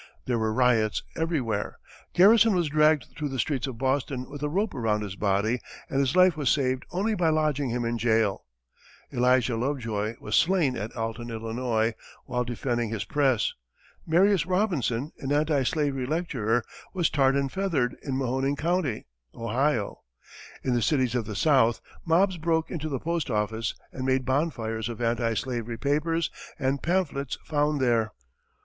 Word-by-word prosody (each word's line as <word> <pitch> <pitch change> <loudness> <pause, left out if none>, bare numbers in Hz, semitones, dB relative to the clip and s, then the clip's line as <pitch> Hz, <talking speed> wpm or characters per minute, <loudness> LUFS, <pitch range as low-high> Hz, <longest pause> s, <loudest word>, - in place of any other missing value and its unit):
There 120 -2 0
were 110 0 0
riots 115 -2 +2
everywhere. 135 -11 -1 0.4
Garrison 215 +3 +6
was 170 -4 +1
dragged 150 -1 +4
through 150 -2 -3
the 135 - -4
streets 135 +1 -1
of 130 -3 -6
Boston 130 0 -1
with 145 0 -9
a 150 - -1
rope 200 +7 0
around 110 -3 0
his 100 -2 -6
body 105 +4 +1 0.3
and 135 - +1
his 135 +1 +1
life 185 -2 +6
was 145 -4 0
saved 130 -2 +1
only 200 +5 0
by 175 -5 +2
lodging 150 -3 +1
him 120 0 -1
in 115 0 -1
jail; 110 -3 +1 0.7
Elijah 125 -1 +3
Lovejoy 115 -4 -2
was - - -2
slain 170 -8 +3
at 105 +4 -5
Alton, 115 +1 -4
Illinois, 115 0 -1 0.3
while 125 0 -1
defending 120 -1 -2
his 110 -1 -3
press; 135 -6 +1 0.5
Marius 180 +1 +3
Robinson, 165 - 0
an 135 - -4
anti 150 -1 +2
slavery 135 -1 0
lecturer, 125 -8 0 0.3
was 175 -3 +1
tarred 135 -2 +3
and 140 -1 0
feathered 165 -10 0
in 135 -2 -3
Mahoning 135 +2 0
County, 160 -6 -1 0.3
Ohio; 120 0 -1 0.6
in 130 - 0
the 120 - +1
cities 130 +1 +1
of 120 -3 -1
the 105 -1 -6
south, 130 -2 +3 0.2
mobs 180 +3 +3
broke 160 0 0
into 155 -2 -3
the 135 - -1
postoffice 115 -9 -1 0.2
and 130 0 -4
made 130 -1 +1
bonfires 120 -6 -1
of 120 - -6
anti 115 -1 0
slavery 120 -1 -3
papers 155 +5 0 0.3
and 135 -1 0
pamphlets 155 -6 -1
found 150 -1 +1
there. 115 -4 +1
130 Hz, 160 wpm, -27 LUFS, 115-155 Hz, 0.7 s, Garrison